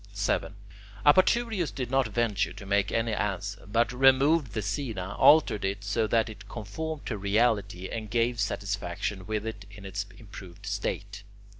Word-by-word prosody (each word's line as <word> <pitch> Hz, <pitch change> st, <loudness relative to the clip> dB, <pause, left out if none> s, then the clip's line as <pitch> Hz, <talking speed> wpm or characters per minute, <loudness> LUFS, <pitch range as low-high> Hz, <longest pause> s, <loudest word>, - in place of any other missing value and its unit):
7. -, -, -1 dB, 0.5 s
Apaturius 205 Hz, -, +4 dB
did 125 Hz, -2 st, -5 dB
not 135 Hz, -2 st, +3 dB
venture 110 Hz, -2 st, 0 dB
to 105 Hz, -, -10 dB
make 100 Hz, 0 st, +1 dB
any 115 Hz, -1 st, 0 dB
answer, 100 Hz, -1 st, -3 dB
but 115 Hz, +2 st, +2 dB
removed 135 Hz, +1 st, +4 dB
the 110 Hz, -, -2 dB
scaena, 105 Hz, -9 st, -3 dB
altered 150 Hz, -9 st, +5 dB
it 100 Hz, +1 st, -2 dB
so 110 Hz, +2 st, 0 dB
that 115 Hz, 0 st, +2 dB
it 110 Hz, -, -10 dB
conformed 145 Hz, +9 st, -5 dB
to 110 Hz, -4 st, -3 dB
reality, 100 Hz, -2 st, +1 dB
and 110 Hz, -2 st, -5 dB
gave 120 Hz, +1 st, +1 dB
satisfaction 100 Hz, -2 st, -3 dB
with 110 Hz, 0 st, -2 dB
it 105 Hz, -3 st, -6 dB
in 100 Hz, -1 st, -12 dB
its 100 Hz, +1 st, -4 dB
improved 100 Hz, -3 st, -11 dB
state. 100 Hz, +1 st, -3 dB
105 Hz, 155 wpm, -28 LUFS, 100-120 Hz, 0.5 s, altered